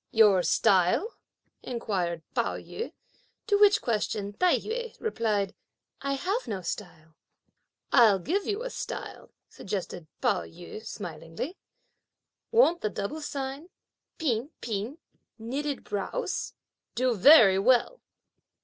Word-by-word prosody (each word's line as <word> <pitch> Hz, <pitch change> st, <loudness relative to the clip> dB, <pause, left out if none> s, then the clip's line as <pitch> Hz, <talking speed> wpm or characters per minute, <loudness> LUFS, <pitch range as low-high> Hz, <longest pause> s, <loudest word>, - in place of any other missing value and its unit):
"Your 210 Hz, -4 st, +5 dB
style?" 190 Hz, -, +3 dB, 0.5 s
inquired 185 Hz, -9 st, -2 dB
Pao -, -, 0 dB
yü; 460 Hz, -, -6 dB, 0.5 s
to 405 Hz, -2 st, +2 dB
which 415 Hz, +1 st, +5 dB
question 210 Hz, -3 st, -1 dB
Tai 360 Hz, -, +3 dB
yü 470 Hz, +1 st, -5 dB
replied, 215 Hz, -, -1 dB, 0.5 s
"I 275 Hz, 0 st, -1 dB
have 385 Hz, -, -2 dB
no 195 Hz, -4 st, -4 dB
style." 165 Hz, -3 st, -6 dB, 0.8 s
"I'll 225 Hz, -6 st, +7 dB
give 360 Hz, -, -1 dB
you 420 Hz, +3 st, -1 dB
a -, -, -4 dB
style," -, -, -6 dB, 0.2 s
suggested 185 Hz, -4 st, -5 dB
Pao 220 Hz, -8 st, +2 dB
yü 175 Hz, +5 st, -10 dB
smilingly; 170 Hz, -, -6 dB, 1.0 s
"won't 450 Hz, -8 st, +4 dB
the 215 Hz, -, 0 dB
double 205 Hz, +10 st, -4 dB
style 275 Hz, +2 st, -5 dB, 0.5 s
'P'in 260 Hz, -4 st, -1 dB
P'in,' 225 Hz, +5 st, -4 dB, 0.4 s
'knitting 275 Hz, +5 st, -3 dB
brows,' 205 Hz, -, -3 dB, 0.4 s
do 250 Hz, +1 st, +2 dB
very 215 Hz, -, +8 dB
well?" 250 Hz, -, +3 dB
230 Hz, 115 wpm, -28 LUFS, 195-320 Hz, 1.0 s, very